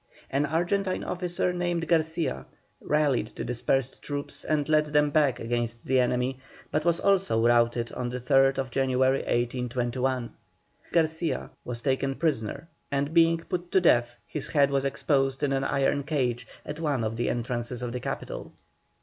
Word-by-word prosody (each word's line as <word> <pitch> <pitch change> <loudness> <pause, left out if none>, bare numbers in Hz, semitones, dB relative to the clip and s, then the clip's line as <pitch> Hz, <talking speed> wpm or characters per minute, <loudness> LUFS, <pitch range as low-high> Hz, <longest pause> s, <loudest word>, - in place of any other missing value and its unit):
An 140 +2 +1
Argentine 185 +5 0
officer 180 0 -1
named 175 -2 -1
Garcia 160 0 0 0.3
rallied 145 -7 +1
the - - -4
dispersed 125 +2 -1
troops 145 -1 -5
and 150 -2 0
led 155 -1 +4
them 150 0 +2
back 145 -5 +3
against 120 0 -2
the 130 0 +3
enemy, 125 +1 0 0.3
but 150 - 0
was 170 0 +2
also 190 - +2
routed 120 0 +3
on 125 -1 -3
the 125 +1 -4
3rd 135 0 +3
January, 130 +1 +2
1821. 125 +1 -1 0.6
Garcia 160 0 0
was 120 -1 -6
taken 135 0 0
prisoner, 145 -3 -1 0.2
and 140 +2 -1
being 165 0 +5
put 175 0 -4
to 190 - +5
death, 120 -8 +3
his 150 - -5
head 140 -2 +3
was 140 0 +1
exposed 135 0 0
in 140 -1 +2
an 135 0 0
iron 140 +1 +1
cage 125 -5 -1 0.2
at 150 +1 -6
one 145 -7 0
of 110 +1 -2
the 120 - -1
entrances 120 0 -3
of 120 - -3
the 125 - -3
capital. - - -5
135 Hz, 160 wpm, -27 LUFS, 125-155 Hz, 0.6 s, being